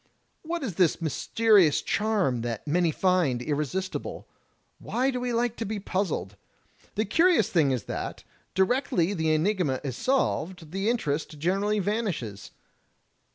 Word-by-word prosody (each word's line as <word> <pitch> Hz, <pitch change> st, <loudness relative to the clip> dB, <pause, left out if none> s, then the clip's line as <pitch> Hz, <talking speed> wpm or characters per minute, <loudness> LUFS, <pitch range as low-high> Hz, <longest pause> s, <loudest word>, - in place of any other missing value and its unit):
What 335 Hz, -1 st, -4 dB
is 225 Hz, -8 st, -3 dB
this 180 Hz, -5 st, +3 dB
mysterious 185 Hz, +2 st, +3 dB
charm 200 Hz, -, 0 dB
that 115 Hz, -2 st, -4 dB
many 170 Hz, +3 st, +2 dB
find 170 Hz, -6 st, +2 dB
irresistible? 150 Hz, +8 st, -3 dB, 0.5 s
Why 260 Hz, +3 st, 0 dB
do 250 Hz, -, -3 dB
we 245 Hz, 0 st, -2 dB
like 235 Hz, 0 st, 0 dB
to -, -, -2 dB
be 215 Hz, +1 st, -3 dB
puzzled? 175 Hz, -, -2 dB, 0.6 s
The 215 Hz, -, +1 dB
curious 325 Hz, -, +3 dB
thing 160 Hz, -6 st, +3 dB
is 125 Hz, -5 st, -1 dB
that -, -, -5 dB, 0.3 s
directly 190 Hz, -3 st, +2 dB
the 160 Hz, -4 st, 0 dB
enigma 155 Hz, -4 st, +1 dB
is 135 Hz, -4 st, -3 dB
solved 185 Hz, -, -1 dB
the 195 Hz, +4 st, 0 dB
interest 155 Hz, -9 st, -1 dB
generally 195 Hz, +7 st, +1 dB
vanishes. 195 Hz, -, -2 dB
185 Hz, 135 wpm, -27 LUFS, 150-220 Hz, 0.6 s, this